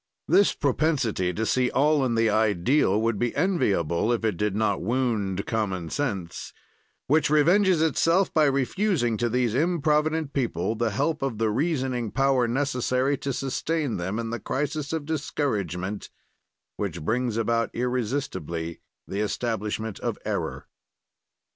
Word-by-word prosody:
"This 200 Hz, -, +4 dB
propensity 135 Hz, -, +1 dB
to 110 Hz, +5 st, -2 dB
see 125 Hz, +2 st, +2 dB
all 150 Hz, +1 st, +3 dB
in 120 Hz, -3 st, 0 dB
the 115 Hz, 0 st, +3 dB
ideal 110 Hz, -, +2 dB
would 115 Hz, -2 st, 0 dB
be 120 Hz, -1 st, -1 dB
enviable 105 Hz, -, +1 dB
if 115 Hz, -1 st, 0 dB
it 105 Hz, -4 st, +1 dB
did 105 Hz, +2 st, -1 dB
not 105 Hz, -2 st, +1 dB
wound 105 Hz, -4 st, -1 dB
common 95 Hz, -7 st, -2 dB
sense, 100 Hz, -12 st, -3 dB, 0.5 s
which 155 Hz, +2 st, +3 dB
revenges 170 Hz, +3 st, +4 dB
itself 165 Hz, +4 st, +2 dB
by 155 Hz, -1 st, +4 dB
refusing 140 Hz, -, +1 dB
to 120 Hz, +1 st, 0 dB
these 120 Hz, -1 st, +1 dB
improvident 155 Hz, 0 st, +1 dB
people 110 Hz, -7 st, -1 dB
the 115 Hz, 0 st, 0 dB
help 150 Hz, +9 st, -1 dB
of 135 Hz, -5 st, -2 dB
the 110 Hz, -1 st, +1 dB
reasoning 130 Hz, -3 st, -1 dB
power 135 Hz, 0 st, +2 dB
necessary 130 Hz, +1 st, 0 dB
to 140 Hz, -, -2 dB
sustain 135 Hz, +1 st, -2 dB
them 95 Hz, +4 st, -3 dB
in 115 Hz, -1 st, -3 dB
the 120 Hz, -, -3 dB
crisis 145 Hz, +5 st, -2 dB
of 160 Hz, -3 st, -2 dB
discouragement 105 Hz, -, -2 dB, 0.7 s
which -, -, -4 dB
brings 120 Hz, +4 st, 0 dB
about 115 Hz, 0 st, +1 dB
irresistibly 110 Hz, -, -3 dB, 0.3 s
the 100 Hz, -, -4 dB
establishment 110 Hz, -1 st, -2 dB
of -, -, -2 dB
error. -, -, -3 dB
120 Hz, 140 wpm, -26 LUFS, 105-145 Hz, 0.7 s, This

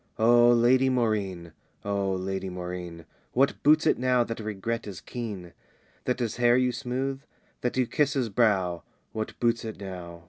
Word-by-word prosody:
O 120 Hz, +1 st, +6 dB
Lady 125 Hz, +2 st, +4 dB
Maurine! 100 Hz, -9 st, -1 dB, 0.3 s
O 100 Hz, -1 st, 0 dB
Lady 95 Hz, +1 st, -3 dB
Maurine! 90 Hz, -2 st, -6 dB, 0.3 s
What 135 Hz, +3 st, +2 dB
boots 155 Hz, +2 st, +5 dB
it -, -, +3 dB
now 125 Hz, -1 st, +3 dB
that 115 Hz, -1 st, -5 dB
regret 110 Hz, +2 st, -4 dB
is 95 Hz, -5 st, -7 dB
keen? 100 Hz, -3 st, -7 dB, 0.5 s
That 125 Hz, -, 0 dB
his 120 Hz, -3 st, -2 dB
hair 120 Hz, 0 st, +4 dB
you 125 Hz, -1 st, +2 dB
smooth? 135 Hz, +2 st, -3 dB, 0.4 s
that 125 Hz, +1 st, -2 dB
you 130 Hz, -, +3 dB
kiss 145 Hz, +4 st, +1 dB
his 130 Hz, -5 st, 0 dB
brow, 95 Hz, -6 st, +1 dB, 0.3 s
What 110 Hz, 0 st, -5 dB
boots 115 Hz, 0 st, +1 dB
it 110 Hz, -3 st, -6 dB
now? 90 Hz, -3 st, -8 dB
115 Hz, 165 wpm, -27 LUFS, 95-125 Hz, 0.5 s, O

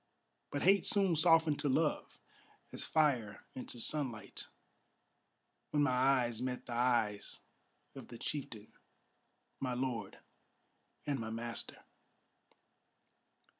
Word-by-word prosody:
But 145 Hz, -, -3 dB
hate 195 Hz, +2 st, +5 dB
soon 195 Hz, -5 st, +3 dB
softened 160 Hz, -2 st, +4 dB
to 145 Hz, -, 0 dB
love, 150 Hz, +3 st, 0 dB, 0.6 s
as -, -, -5 dB
fire 135 Hz, -10 st, +1 dB
into 125 Hz, -1 st, -3 dB
sunlight, 120 Hz, -7 st, -2 dB, 1.2 s
When 145 Hz, -1 st, +2 dB
my 145 Hz, -, +3 dB
eyes 125 Hz, -2 st, +2 dB
met 125 Hz, -1 st, -3 dB
the 120 Hz, -, -6 dB
eyes 120 Hz, -4 st, +1 dB, 0.6 s
of 135 Hz, -3 st, -10 dB
the 120 Hz, -, -10 dB
chieftain, 120 Hz, -6 st, -6 dB, 0.9 s
my 130 Hz, -2 st, -2 dB
lord, 125 Hz, -2 st, -3 dB, 0.9 s
and 140 Hz, -3 st, -1 dB
my 110 Hz, -1 st, -4 dB
master. 115 Hz, +1 st, -6 dB
130 Hz, 105 wpm, -35 LUFS, 120-150 Hz, 1.2 s, hate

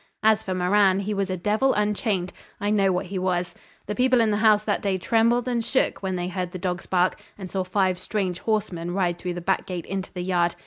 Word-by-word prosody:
As 220 Hz, 0 st, +4 dB
for 190 Hz, -4 st, -3 dB
Moran, 190 Hz, +1 st, +3 dB
he 210 Hz, +2 st, -2 dB
was 195 Hz, -1 st, -1 dB
a 185 Hz, -, -2 dB
devil 215 Hz, +9 st, +1 dB
unchained. 210 Hz, -3 st, 0 dB, 0.3 s
I 205 Hz, +1 st, 0 dB
know 195 Hz, -2 st, +3 dB
what 180 Hz, +1 st, -1 dB
he 185 Hz, +1 st, -4 dB
was. 180 Hz, -1 st, -1 dB, 0.3 s
The 210 Hz, -, -3 dB
people 255 Hz, +2 st, +3 dB
in 225 Hz, -2 st, +3 dB
the 205 Hz, -, +1 dB
house 215 Hz, -1 st, +4 dB
that 210 Hz, -1 st, -1 dB
day 195 Hz, -2 st, 0 dB
trembled 230 Hz, +5 st, +2 dB
and 240 Hz, -2 st, 0 dB
shook 260 Hz, -, 0 dB
when 190 Hz, -1 st, -2 dB
they 175 Hz, 0 st, -2 dB
heard 180 Hz, -1 st, -4 dB
the -, -, -4 dB
dogs 180 Hz, -1 st, -3 dB
bark 180 Hz, 0 st, +1 dB, 0.2 s
and 190 Hz, -3 st, -8 dB
saw 190 Hz, -1 st, -1 dB
five 185 Hz, -1 st, 0 dB
strange 185 Hz, -2 st, -2 dB
horsemen 185 Hz, -6 st, -2 dB
ride 175 Hz, -3 st, 0 dB
through 180 Hz, -1 st, -4 dB
the 175 Hz, -, -5 dB
back 190 Hz, +2 st, 0 dB
gate 180 Hz, -2 st, -4 dB
into 190 Hz, -1 st, -4 dB
the 180 Hz, -2 st, -5 dB
yard. 175 Hz, -2 st, +1 dB
190 Hz, 235 wpm, -24 LUFS, 180-210 Hz, 0.3 s, As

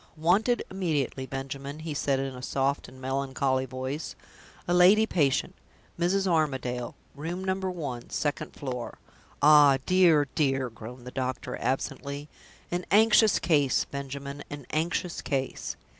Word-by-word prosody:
"Wanted 195 Hz, +10 st, +2 dB
immediately, 150 Hz, -8 st, -1 dB
Benjamin," 135 Hz, +2 st, -5 dB
he 160 Hz, -1 st, -4 dB
said 140 Hz, -1 st, +1 dB
in 135 Hz, 0 st, -3 dB
a 125 Hz, -, -8 dB
soft 135 Hz, +2 st, -1 dB
and 130 Hz, +1 st, -14 dB
melancholy 130 Hz, 0 st, -1 dB
voice. 130 Hz, +4 st, -5 dB, 0.5 s
"A 175 Hz, -, +1 dB
lady 190 Hz, +5 st, +6 dB
patient 145 Hz, -10 st, +1 dB, 0.5 s
Mrs. 190 Hz, +3 st, +2 dB
Armadale, 130 Hz, -8 st, 0 dB, 0.2 s
Room 170 Hz, +6 st, -5 dB
No. 190 Hz, 0 st, +1 dB
1, 170 Hz, -10 st, -4 dB
second 145 Hz, -2 st, -2 dB
floor. 125 Hz, -4 st, -5 dB, 0.5 s
Ah, 145 Hz, -2 st, +7 dB
dear, 170 Hz, -6 st, +5 dB
dear!" 135 Hz, -5 st, +1 dB
groaned 120 Hz, +3 st, -10 dB
the 125 Hz, -, -7 dB
doctor, 130 Hz, -1 st, -3 dB
absently; 140 Hz, +3 st, -3 dB, 0.4 s
"an 175 Hz, +1 st, -1 dB
anxious 215 Hz, +2 st, +5 dB
case, 145 Hz, -6 st, +2 dB
Benjamin 140 Hz, +1 st, -6 dB
an 145 Hz, -2 st, -7 dB
anxious 170 Hz, +2 st, -1 dB
case." 135 Hz, -3 st, -3 dB
140 Hz, 130 wpm, -28 LUFS, 130-170 Hz, 0.5 s, Ah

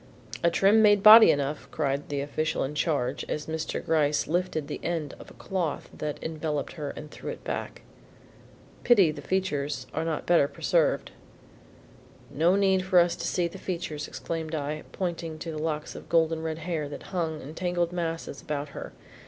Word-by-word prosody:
"A 170 Hz, -, +4 dB
trim 200 Hz, +5 st, +4 dB
made 205 Hz, -2 st, +5 dB
body 220 Hz, +1 st, +11 dB
enough," 145 Hz, +1 st, 0 dB
cried 140 Hz, -2 st, -2 dB
the 140 Hz, -1 st, -1 dB
official 155 Hz, +2 st, -1 dB
in 135 Hz, -, -3 dB
charge 145 Hz, -4 st, 0 dB
as 150 Hz, -, -3 dB
Mr. 160 Hz, 0 st, -4 dB
Gryce 150 Hz, -2 st, +2 dB
lifted 170 Hz, -2 st, -1 dB
an -, -, -4 dB
end 165 Hz, -4 st, -2 dB
of -, -, -11 dB
the -, -, -14 dB
cloth 175 Hz, -6 st, -3 dB
that 150 Hz, -1 st, -4 dB
enveloped 155 Hz, -2 st, -3 dB
her 150 Hz, -4 st, -5 dB
and 150 Hz, 0 st, -9 dB
threw -, -, -7 dB
it -, -, -7 dB
back. -, -, -5 dB, 1.0 s
"Pity 200 Hz, -10 st, +5 dB
the 145 Hz, -1 st, -8 dB
features 150 Hz, -5 st, -1 dB
are 160 Hz, -, -1 dB
not 165 Hz, -2 st, -2 dB
better 170 Hz, -5 st, +4 dB
preserved." -, -, +1 dB, 1.2 s
"No 165 Hz, +6 st, +3 dB
need 190 Hz, -1 st, +3 dB
for 185 Hz, -1 st, +2 dB
us 175 Hz, 0 st, +5 dB
to 170 Hz, -, -3 dB
see 175 Hz, -1 st, +1 dB
the 170 Hz, -, -10 dB
features," 165 Hz, -5 st, -4 dB
exclaimed 165 Hz, -1 st, -4 dB
I, 150 Hz, +1 st, -4 dB
pointing 170 Hz, -3 st, -4 dB
to 165 Hz, +1 st, -5 dB
the 155 Hz, -1 st, -5 dB
locks 155 Hz, -1 st, -3 dB
of -, -, -11 dB
golden 165 Hz, -1 st, +2 dB
red 160 Hz, -1 st, -3 dB
hair 160 Hz, -3 st, -3 dB
that 145 Hz, -, -8 dB
hung 160 Hz, -4 st, -1 dB
in 150 Hz, +2 st, -9 dB
tangled 175 Hz, 0 st, -1 dB
masses 165 Hz, -4 st, -4 dB
about 150 Hz, -1 st, -4 dB
her. -, -, -8 dB
160 Hz, 180 wpm, -27 LUFS, 150-175 Hz, 1.2 s, body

